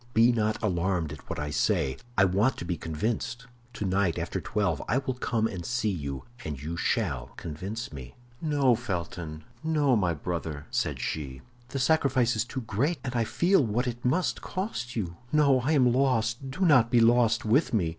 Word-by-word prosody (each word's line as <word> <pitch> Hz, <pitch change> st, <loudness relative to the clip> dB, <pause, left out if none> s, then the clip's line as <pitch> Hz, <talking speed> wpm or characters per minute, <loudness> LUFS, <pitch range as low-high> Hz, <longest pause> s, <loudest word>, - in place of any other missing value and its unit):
Be 115 Hz, +2 st, +6 dB
not 110 Hz, -2 st, +1 dB
alarmed 90 Hz, -5 st, 0 dB
at 75 Hz, -, -13 dB
what -, -, -3 dB
I 75 Hz, 0 st, -3 dB
say; 65 Hz, -1 st, +1 dB, 0.2 s
I 95 Hz, -, +6 dB
want 100 Hz, +8 st, +2 dB
to -, -, -5 dB
be 90 Hz, 0 st, -1 dB
convinced. 110 Hz, +10 st, -3 dB, 0.3 s
Tonight, 95 Hz, -5 st, 0 dB
after -, -, -3 dB
twelve, 95 Hz, -8 st, 0 dB
I 120 Hz, -, +2 dB
will 135 Hz, -1 st, -1 dB
come 115 Hz, -3 st, -1 dB
and 95 Hz, -6 st, -3 dB
see 120 Hz, 0 st, 0 dB
you, 70 Hz, -7 st, -4 dB, 0.2 s
and 75 Hz, -3 st, -5 dB
you 80 Hz, +4 st, -4 dB
shall 85 Hz, -, -1 dB
convince 95 Hz, +7 st, -5 dB
me." 65 Hz, -3 st, -9 dB, 0.3 s
"No, 145 Hz, -5 st, +3 dB
Felton, 85 Hz, -8 st, -4 dB, 0.2 s
no, 150 Hz, -5 st, +3 dB
my 90 Hz, -6 st, +1 dB
brother," 80 Hz, -2 st, -4 dB
said -, -, -1 dB
she; 70 Hz, -4 st, -4 dB, 0.3 s
"the 135 Hz, -, -5 dB
sacrifice 130 Hz, -4 st, +3 dB
is 110 Hz, +1 st, 0 dB
too 130 Hz, +2 st, -5 dB
great, 135 Hz, -, 0 dB
and 125 Hz, -1 st, -4 dB
I 115 Hz, -1 st, +2 dB
feel 175 Hz, -, +3 dB
what 120 Hz, +3 st, 0 dB
it 120 Hz, -1 st, -4 dB
must 155 Hz, +9 st, +1 dB
cost 185 Hz, -, -4 dB
you. 90 Hz, -7 st, -3 dB
No, 140 Hz, -3 st, +4 dB
I 140 Hz, +6 st, +1 dB
am 125 Hz, -5 st, +4 dB
lost; 125 Hz, -1 st, +1 dB
do 135 Hz, +8 st, -7 dB
not 140 Hz, -10 st, +5 dB
be 120 Hz, -1 st, +4 dB
lost 115 Hz, 0 st, +4 dB
with 125 Hz, +9 st, +3 dB
me. 95 Hz, -8 st, +1 dB
115 Hz, 185 wpm, -28 LUFS, 85-130 Hz, 0.3 s, Be